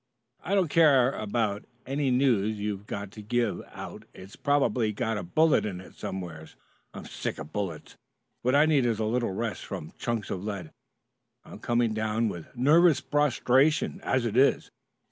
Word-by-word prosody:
"I 195 +5 0
don't 190 -4 +3
care 140 -6 +5
about 105 -3 -2 0.2
any 135 +1 -1
news 115 -5 +2
you've 105 0 -4
got 100 -1 -5
to 105 - -10
give 115 +1 -1
out - - -9
It's 95 +2 -12
probably 135 -6 +1
got 110 +1 -2
a - - -4
bullet 155 - +3
in 95 -4 -4
it 95 - -13
somewhere. 85 -4 -6 0.4
I'm - - -9
sick - - -4
of 75 - -9
bullets. 95 -7 -5 0.4
What 125 +3 +2
I 145 +2 +6
need 145 -6 +3
is 115 -2 0
a 110 - -1
little 120 0 0
rest 110 +3 -3
from 75 - -7
chunks 115 -4 -2
of 95 - -4
lead. 100 -6 -5 0.7
I'm - - -11
coming 120 -2 +1
down 110 +1 0
with 85 -5 -7
nervous 150 +4 +5
prostration 145 0 +2
as 130 -2 +1
it 115 -2 -2
is. 135 +2 +3
115 Hz, 170 wpm, -27 LUFS, 100-135 Hz, 0.7 s, I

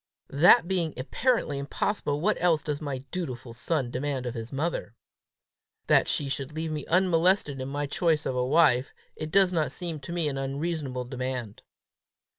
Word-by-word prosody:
"That 160 +3 +6
being 175 -4 -1
apparently 150 - 0
impossible, 145 +1 -1
what 210 +5 +2
else 165 -4 +3
does 150 -1 -3
my 135 -3 -4
dutiful 130 -9 -5
son 130 0 -1
demand 130 0 -2
of 120 - -3
his 115 -1 -6
mother?" 140 -6 -3 0.9
"That - - +4
she 145 - -1
should 135 +1 -4
leave 160 0 -3
me 150 -1 -4
unmolested 175 -5 +2
in 130 - -4
my 145 +1 -2
choice 160 +1 +1
of 130 - -1
a 125 - +1
wife. 135 -2 +3 0.2
It 155 - -5
does 190 +1 +4
not 160 -3 +1
seem 170 -4 -4
to 145 - -9
me 170 -3 0
an 135 -2 -2
unreasonable 135 -2 -3
demand!" 125 -4 -4
145 Hz, 170 wpm, -27 LUFS, 130-170 Hz, 0.9 s, That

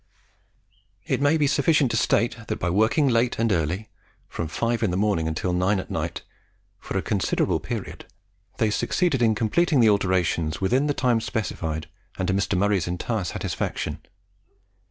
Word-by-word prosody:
It - - -1
may 145 +3 +4
be 150 - +2
sufficient 140 -1 +3
to - - -1
state 115 +3 +2
that - - -2
by 90 - -1
working 110 - +3
late 120 -1 +2
and 115 -1 +1
early 90 +4 -1 0.4
from 85 - -4
5 115 +8 -1
in 110 - +2
the 90 - -1
morning 100 -6 +1
until 80 +3 -2
9 95 +3 +2
at - - -7
night - - -3 0.6
for - - -4
a 95 - -1
considerable 100 -3 0
period - - -6 0.5
they 110 -2 +1
succeeded 150 - 0
in 110 -2 +3
completing 145 +8 +2
the 115 -2 +6
alterations 90 -5 0
within 125 +9 +1
the 145 - 0
time 120 -3 +2
specified, 80 -9 -3 0.3
and 95 - -1
to - - +2
Mr. 100 0 0
Murray's 100 -2 +1
entire 90 +4 -2
satisfaction. 80 -2 -3
105 Hz, 165 wpm, -24 LUFS, 90-120 Hz, 0.6 s, the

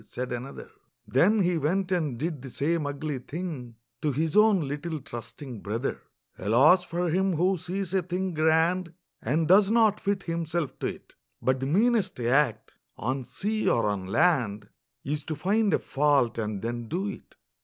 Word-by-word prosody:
said 125 +3 -6
another; 125 +3 -6 0.4
Then 175 - +3
he 175 -2 +1
went 180 +6 0
and 155 -9 0
did 155 0 -3
the 135 - -8
same 150 +4 -1
ugly 145 -1 -3
thing 140 -5 -6 0.3
To 150 - +1
his 155 +3 -1
own 210 -7 +5
little 150 +3 -4
trusting 125 0 -8
brother! 115 +6 -3 0.4
Alas 135 - +5
for 175 -1 -2
him 190 +2 +2
who 185 +4 +2
sees 185 +2 -4
a 190 - +3
thing 180 +1 -3
grand 165 +3 +2 0.3
And 155 +7 0
does 195 +3 +6
not 220 -2 +4
fit 200 -1 -1
himself 165 -3 -3
to - - -1
it! - - -8 0.3
But 130 0 +1
the 135 - -2
meanest 215 - +2
act, 120 -2 +1 0.3
on 130 +4 -2
sea 215 - -1
or 115 - +2
on 100 -3 -2
land, 115 - +1 0.3
Is 145 +1 -3
to 155 - -3
find 200 +7 +1
a - - +4
fault, 140 -5 +1
and 105 -2 -3
then 120 0 -3
do 185 - -2
it! 200 - -8
155 Hz, 170 wpm, -27 LUFS, 130-185 Hz, 0.4 s, does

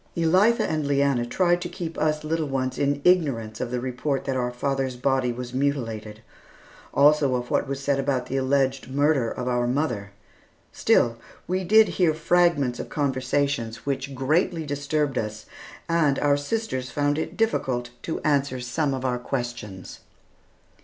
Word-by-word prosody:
Elitha 190 +8 +4
and 155 -2 -1
Leanna 140 -4 +2
tried 175 +6 +2
to 175 - -4
keep 170 -2 -6
us 155 0 0
little 160 0 -1
ones 130 -1 -2
in 140 0 0
ignorance 135 -12 +2
of 125 - -2
the 125 0 -2
report 130 +2 -2
that 135 - -1
our 125 -1 0
father's 135 +1 -2
body 130 0 +1
was 125 +1 -6
mutilated, 115 -6 -2 0.7
also 145 -2 +4
of 125 0 -4
what - - +1
was 135 0 -3
said 140 0 0
about 135 -2 0
the 135 - -4
alleged 135 0 +1
murder 140 -3 +2
of 125 - -5
our 120 -1 +1
mother. 120 -7 -1 0.6
Still 115 -1 +2 0.3
we 185 +1 -1
did 215 +4 +6
hear 170 -4 +1
fragments 160 -6 +2
of - - -5
conversations 130 -4 -1
which 135 0 -3
greatly 155 +5 +1
disturbed 145 -1 -1
us, 110 0 -5 0.4
and 160 -5 +2
our 145 -1 +3
sisters 145 - -3
found 145 +2 0
it - - -4
difficult 130 - 0
to 160 - -3
answer 140 -3 +1
some 135 +3 -1
of 130 0 -5
our 125 -1 0
questions. 120 -7 -5
140 Hz, 160 wpm, -25 LUFS, 125-155 Hz, 0.7 s, did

